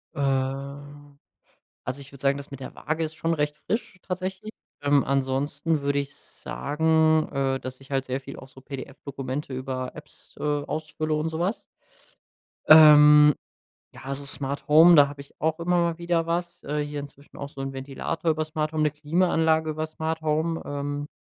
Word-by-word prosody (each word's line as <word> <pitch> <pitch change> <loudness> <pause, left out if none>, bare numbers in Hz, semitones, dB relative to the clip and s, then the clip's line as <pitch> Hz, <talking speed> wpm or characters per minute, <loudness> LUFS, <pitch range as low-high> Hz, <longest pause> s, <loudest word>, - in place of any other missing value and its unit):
Ähm, 140 +1 -3 0.6
also 130 +3 -5
ich 140 - -12
würde 140 -1 -14
sagen, 140 0 +2
das 140 0 -10
mit 135 - -8
der 130 - -8
Waage 160 +1 -2
ist 160 0 -4
schon 165 +1 -1
recht 150 -1 -1
frisch 215 -3 -3
tatsächlich, 185 +3 -5 0.3
ähm, 145 -1 +3
ansonsten 140 +3 0
würde 140 0 +1
ich 140 0 -5
sagen, 160 +1 +1
äh, 135 -1 0
dass 130 0 -8
ich 135 +1 -16
halt 135 -1 0
sehr 130 +1 -2
viel 135 +1 -9
auch 130 - -12
so 130 - -15
PDF-Dokumente 135 0 -6
über 130 0 -4
Apps, 150 0 -14
äh, - - -10
ausfülle 155 +1 -2
und 155 +1 0
so 160 +1 -5
was. 190 +6 -1 1.0
Ähm, 150 -1 +9 0.6
ja, - - -13
also 140 +1 -5
Smart 140 0 -4
Home, 165 +3 +8
da 145 -1 +7
habe 140 0 -9
ich 140 - -18
auch 160 +1 0
immer 175 +1 +1
mal 170 -1 +1
wieder 170 -1 0
was 175 +1 -3
äh, 150 +1 -2
hier 145 0 -5
inzwischen 140 0 -12
auch 140 - -6
so 135 - -8
'n 135 0 -4
Ventilator 140 +5 -2
über 155 0 -1
Smart 155 0 -2
Home, 155 -1 0
'ne 150 - +2
Klimaanlage 160 0 +1
über 155 +1 -3
Smart 160 0 -4
Home, 160 +2 0
ähm, 145 0 -4
150 Hz, 180 wpm, -25 LUFS, 140-160 Hz, 1.0 s, Ähm